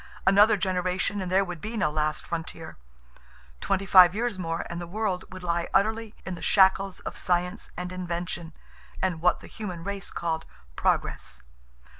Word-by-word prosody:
Another 200 Hz, +3 st, +6 dB
generation 185 Hz, +1 st, -1 dB
and 185 Hz, -1 st, -4 dB
there 195 Hz, +1 st, +4 dB
would 175 Hz, -3 st, -7 dB
be 225 Hz, +2 st, -4 dB
no 155 Hz, -8 st, +1 dB
last 155 Hz, 0 st, -1 dB
frontier. 165 Hz, -1 st, -5 dB, 0.8 s
Twenty 195 Hz, 0 st, 0 dB
five 185 Hz, -1 st, +8 dB
years 230 Hz, -3 st, -1 dB
more 165 Hz, -2 st, -2 dB
and 170 Hz, 0 st, -5 dB
the 175 Hz, -, -6 dB
world 195 Hz, -1 st, -2 dB
would 185 Hz, -1 st, -9 dB
lie 170 Hz, -1 st, 0 dB
utterly 220 Hz, +2 st, +1 dB
in 190 Hz, -, -4 dB
the 170 Hz, -, -8 dB
shackles 195 Hz, 0 st, +3 dB
of -, -, -6 dB
science 180 Hz, +2 st, -1 dB
and 180 Hz, 0 st, -4 dB
invention 175 Hz, -2 st, -4 dB, 0.5 s
and 175 Hz, -4 st, -1 dB
what 180 Hz, -, +3 dB
the -, -, -11 dB
human 185 Hz, -6 st, -6 dB
race 200 Hz, 0 st, -4 dB
called 160 Hz, -1 st, -3 dB, 0.3 s
progress. -, -, -1 dB
180 Hz, 165 wpm, -27 LUFS, 170-195 Hz, 0.8 s, five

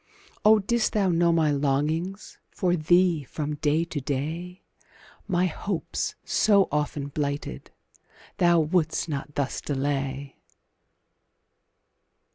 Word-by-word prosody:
Oh, 215 Hz, +1 st, +7 dB
didst 220 Hz, +2 st, 0 dB
thou 200 Hz, -3 st, +2 dB
know 170 Hz, 0 st, +3 dB
my 160 Hz, -2 st, +3 dB
longings 150 Hz, +7 st, -1 dB
For 180 Hz, -2 st, 0 dB
thee, 175 Hz, 0 st, +3 dB
from 150 Hz, +3 st, -4 dB
day 155 Hz, +2 st, +1 dB
to 160 Hz, -4 st, -5 dB
day, 160 Hz, +7 st, -4 dB, 0.6 s
My 180 Hz, 0 st, +2 dB
hopes, 185 Hz, +1 st, -3 dB
so 200 Hz, -3 st, +4 dB
often 145 Hz, -1 st, -2 dB
blighted, 140 Hz, -, -4 dB, 0.7 s
Thou 175 Hz, -2 st, +4 dB
wouldst 160 Hz, +1 st, 0 dB
not 145 Hz, -1 st, -5 dB
thus 140 Hz, -2 st, -2 dB
delay! 140 Hz, -1 st, -3 dB
155 Hz, 105 wpm, -26 LUFS, 145-180 Hz, 0.7 s, Oh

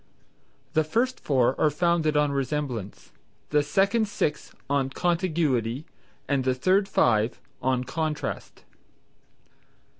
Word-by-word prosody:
The 155 Hz, -, +3 dB
first 235 Hz, +12 st, 0 dB
four 130 Hz, -3 st, +2 dB
are 155 Hz, -, +5 dB
founded 160 Hz, -1 st, +1 dB
on 150 Hz, -1 st, +2 dB
resemblance, 135 Hz, -7 st, -3 dB, 0.4 s
the 150 Hz, 0 st, +4 dB
second 200 Hz, +9 st, +2 dB
six 155 Hz, -7 st, -2 dB, 0.2 s
on 140 Hz, -1 st, +1 dB
contiguity 155 Hz, -, 0 dB, 0.4 s
and 140 Hz, -2 st, +1 dB
the 130 Hz, 0 st, +1 dB
third 190 Hz, +9 st, +2 dB
five, 110 Hz, 0 st, +2 dB, 0.2 s
on 130 Hz, -1 st, +1 dB
contrast. 155 Hz, +3 st, -4 dB
150 Hz, 110 wpm, -26 LUFS, 130-170 Hz, 0.4 s, are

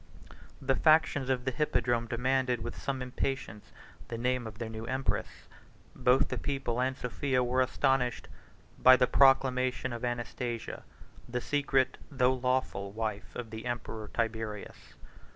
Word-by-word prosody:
The 135 Hz, -, +1 dB
factions 145 Hz, -4 st, +3 dB
of 125 Hz, -2 st, 0 dB
the 130 Hz, -, +1 dB
hippodrome 120 Hz, -4 st, 0 dB
demanded, 125 Hz, 0 st, 0 dB
with 120 Hz, -, -5 dB
some 135 Hz, -2 st, -3 dB
impatience, 125 Hz, -4 st, -4 dB, 0.4 s
the 115 Hz, -, -5 dB
name 125 Hz, 0 st, 0 dB
of 105 Hz, -1 st, -9 dB
their 115 Hz, 0 st, -4 dB
new 110 Hz, 0 st, -7 dB
empress: 130 Hz, +1 st, -3 dB, 0.5 s
both 125 Hz, +2 st, +3 dB
the -, -, -3 dB
people 135 Hz, -4 st, -2 dB
and 130 Hz, +1 st, 0 dB
Sophia 125 Hz, +1 st, 0 dB
were 125 Hz, +1 st, +2 dB
astonished 130 Hz, -1 st, +1 dB, 0.5 s
by 130 Hz, 0 st, +8 dB
the 125 Hz, 0 st, +4 dB
proclamation 130 Hz, -1 st, +3 dB
of 120 Hz, -, -6 dB
Anastasia, 120 Hz, -1 st, -3 dB, 0.5 s
the 125 Hz, +1 st, -1 dB
secret, 135 Hz, -1 st, +1 dB
though 130 Hz, -3 st, +3 dB
lawful, 125 Hz, -6 st, -1 dB
wife 110 Hz, -1 st, -4 dB
of 115 Hz, -2 st, -6 dB
the 110 Hz, +2 st, -6 dB
emperor 110 Hz, -3 st, -4 dB
Tiberius. 110 Hz, -2 st, -4 dB
125 Hz, 140 wpm, -30 LUFS, 115-130 Hz, 0.5 s, by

